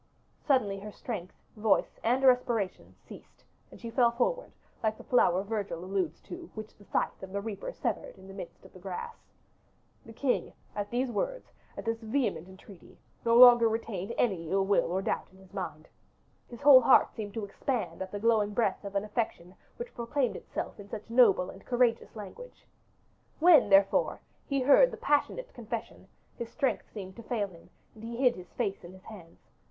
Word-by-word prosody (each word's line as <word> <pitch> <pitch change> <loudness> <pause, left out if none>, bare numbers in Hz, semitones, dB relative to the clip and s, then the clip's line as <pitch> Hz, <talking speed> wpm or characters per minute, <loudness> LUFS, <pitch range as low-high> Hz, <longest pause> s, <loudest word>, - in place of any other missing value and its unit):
Suddenly 215 -9 +2
her 210 +2 -8
strength, 200 -5 -6 0.2
voice, 210 -2 +1
and 250 +4 +2
respiration 240 -6 +1
ceased, - - -14 0.3
and - - -14
she 230 - -7
fell 240 -1 +4
forward, - - -1 0.3
like 220 -1 0
the - - -12
flower 190 -7 +3
Virgil 200 -5 -4
alludes 185 -4 -2
to, 350 -1 -9
which 215 -1 -8
the 205 - -18
scythe - - -1
of 190 0 -8
the 200 - -2
reaper 220 - -5
severed - - -4
in 190 0 -14
the 195 - -10
midst 190 -1 -9
of 190 - -16
the 185 - -13
grass. 195 - -6 0.9
The 225 - -12
king, 250 +3 -1 0.2
at 205 0 -3
these 245 +1 -1
words, - - -3 0.3
at - - -6
this 225 0 -2
vehement 225 - -1
entreaty, 190 0 -15 0.3
no 230 0 +3
longer 240 -2 +9
retained 220 -2 -4
any 180 -9 0
ill 195 +1 +2
will 195 -3 +2
or 190 +2 -1
doubt 215 - -2
in 190 - -19
his 190 0 -19
mind: 160 -6 -6 0.6
his 240 - -11
whole 275 -3 +9
heart 255 - +5
seemed 205 -3 -7
to 220 -2 -3
expand 235 +3 -3
at 190 0 -5
the 205 - -4
glowing 210 -2 +2
breath 220 -5 0
of 200 0 -7
an 200 - +1
affection 210 -5 -3 0.2
which 480 0 -7
proclaimed 240 +2 -1
itself - - -6
in 205 0 -11
such 220 +2 -8
noble 220 -7 +5
and 195 - -14
courageous 240 -2 +1
language. 220 - -10 0.7
When, 320 -8 +6
therefore, 195 0 +4 0.3
he 275 -2 0
heard 285 - +6
the - - -8
passionate - - 0
confession, 230 -1 -7 0.3
his 235 -1 -4
strength 275 0 -2
seemed 190 -3 -8
to - - -8
fail 220 -4 -2
him, 170 -2 -17 0.2
and 220 - -14
he 230 +1 -6
hid 250 -1 +3
his 180 -1 -12
face 195 -1 -2
in 175 +1 -11
his 190 - -15
hands. 180 -7 -14
220 Hz, 190 wpm, -30 LUFS, 195-245 Hz, 0.9 s, longer